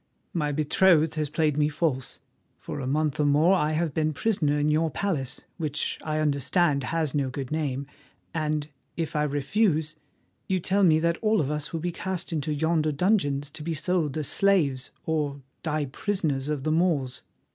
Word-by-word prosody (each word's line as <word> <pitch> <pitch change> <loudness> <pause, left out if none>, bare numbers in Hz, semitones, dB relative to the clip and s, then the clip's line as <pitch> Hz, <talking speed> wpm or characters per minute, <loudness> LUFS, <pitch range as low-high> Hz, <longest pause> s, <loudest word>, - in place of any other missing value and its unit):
My 150 -4 0
betrothed 155 +2 +3
has 155 -2 -2
played 150 -1 +1
me 150 0 +3
false. 150 -4 -1 0.4
For - - -6
a 130 - -3
month 150 +1 0
or 150 - +3
more 155 +6 +5
I 155 -5 +2
have 160 -1 0
been 155 0 0
prisoner 155 -6 +1
in 150 +1 +2
your 160 +1 +2
palace, 150 -6 -2 0.2
which 155 -4 -2
I 155 -1 -2
understand 145 0 +1
has 160 -2 -1
no 140 -3 0
good 130 0 -5
name, 140 -3 -1 0.5
and, 155 -2 -1 0.3
if 165 -2 -3
I 150 - +2
refuse, 150 +2 +1 0.5
you 190 -1 +1
tell 195 +3 +1
me 160 -4 +6
that 170 +1 +1
all 215 -1 +3
of 145 -1 0
us 150 0 -3
will 165 - -3
be 175 +1 -1
cast 185 0 -4
into 155 -1 -1
yonder 155 +1 +1
dungeons 145 -4 +1
to 155 - -8
be 165 +1 -2
sold 155 -1 0
as 150 -3 -1
slaves 155 -10 +2 0.2
or 145 -3 -1 0.2
die 155 -2 -1
prisoners 145 -2 -1
of 150 -3 -2
the 155 - 0
Moors. 155 -6 +1
155 Hz, 180 wpm, -26 LUFS, 145-165 Hz, 0.5 s, me